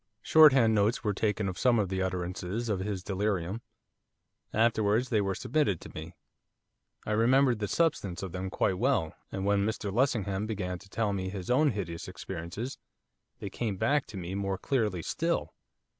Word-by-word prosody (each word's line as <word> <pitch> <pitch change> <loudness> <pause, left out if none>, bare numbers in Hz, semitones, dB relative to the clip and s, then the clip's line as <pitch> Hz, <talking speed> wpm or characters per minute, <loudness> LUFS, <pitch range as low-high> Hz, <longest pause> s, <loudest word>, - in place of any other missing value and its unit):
Shorthand 135 -8 +7
notes 105 +3 +2
were 105 -2 +1
taken 105 0 0
of 95 - -4
some 125 -2 +4
of 100 -4 +1
the 95 0 -1
utterances 95 +4 -3
of 100 -3 0
his 95 -1 -3
delirium. 95 +1 -1 0.9
Afterwards 110 +1 +2
they 110 -4 +2
were 95 -1 -1
submitted 130 - 0
to - - -10
me. 80 +3 -8 0.9
I - - -3
remembered 120 +2 +4
the 105 - -1
substance 105 - 0
of 95 - -5
them 95 +1 -4
quite 95 0 0
well, 120 - +1 0.2
and 95 0 -3
when 100 0 +3
Mr 105 -2 -2
Lessingham 105 -5 +1
began 90 -5 -3
to 100 - -17
tell 105 0 0
me 95 -1 -2
of 95 - -5
his 95 +2 -4
own 150 +4 +4
hideous 90 -8 -4
experiences 95 +6 -6 0.6
they 100 - -6
came 105 -3 -3
back 140 +8 +1
to 105 - -8
me 90 0 -5
more 100 -1 -2
clearly 105 - -1
still. - - -1
100 Hz, 175 wpm, -29 LUFS, 95-115 Hz, 0.9 s, Shorthand